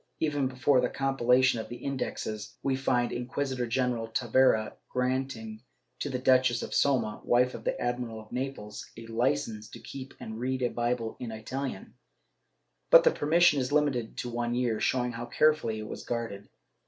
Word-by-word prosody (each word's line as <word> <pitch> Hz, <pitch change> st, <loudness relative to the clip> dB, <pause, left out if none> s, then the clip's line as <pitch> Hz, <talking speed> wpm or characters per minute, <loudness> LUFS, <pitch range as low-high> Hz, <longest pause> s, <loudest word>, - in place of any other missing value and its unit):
Even 145 Hz, -4 st, +1 dB
before 130 Hz, +1 st, +3 dB
the 125 Hz, -, +1 dB
compilation 130 Hz, -2 st, +3 dB
of 110 Hz, -, -6 dB
the 120 Hz, -, -6 dB
Indexes, 120 Hz, -4 st, -4 dB
we 135 Hz, -1 st, +1 dB
find 125 Hz, -2 st, +1 dB
Inquisitor 125 Hz, 0 st, -2 dB
general 120 Hz, -1 st, 0 dB
Tavera 115 Hz, -1 st, +2 dB, 0.2 s
granting 125 Hz, -4 st, -2 dB, 0.4 s
to 145 Hz, -, -2 dB
the 130 Hz, -, -1 dB
Duchess 130 Hz, -2 st, +3 dB
of -, -, -6 dB
Soma, 120 Hz, -6 st, +1 dB
wife 125 Hz, +1 st, +3 dB
of -, -, -8 dB
the -, -, -1 dB
Admiral 120 Hz, -2 st, -2 dB
of 110 Hz, 0 st, -14 dB
Naples, 125 Hz, -5 st, -5 dB
a 115 Hz, -, -8 dB
licence 115 Hz, -2 st, -1 dB
to -, -, -10 dB
keep 135 Hz, -1 st, -9 dB
and 110 Hz, 0 st, -7 dB
read 130 Hz, +1 st, -1 dB
a 120 Hz, -, +2 dB
Bible 120 Hz, -1 st, -2 dB
in 120 Hz, -, -5 dB
ItaHan, 130 Hz, +5 st, -5 dB, 1.0 s
but -, -, +9 dB
the -, -, +5 dB
permission 165 Hz, -, +4 dB
is 130 Hz, 0 st, -2 dB
limited 140 Hz, -6 st, +1 dB
to 120 Hz, -, -3 dB
one 120 Hz, 0 st, -1 dB
year, 120 Hz, -3 st, 0 dB
showing 125 Hz, -1 st, +1 dB
how 120 Hz, 0 st, -6 dB
carefully 150 Hz, -8 st, +2 dB
it 110 Hz, 0 st, -6 dB
was -, -, -7 dB
guarded. 115 Hz, -4 st, -4 dB
125 Hz, 170 wpm, -29 LUFS, 115-130 Hz, 1.0 s, but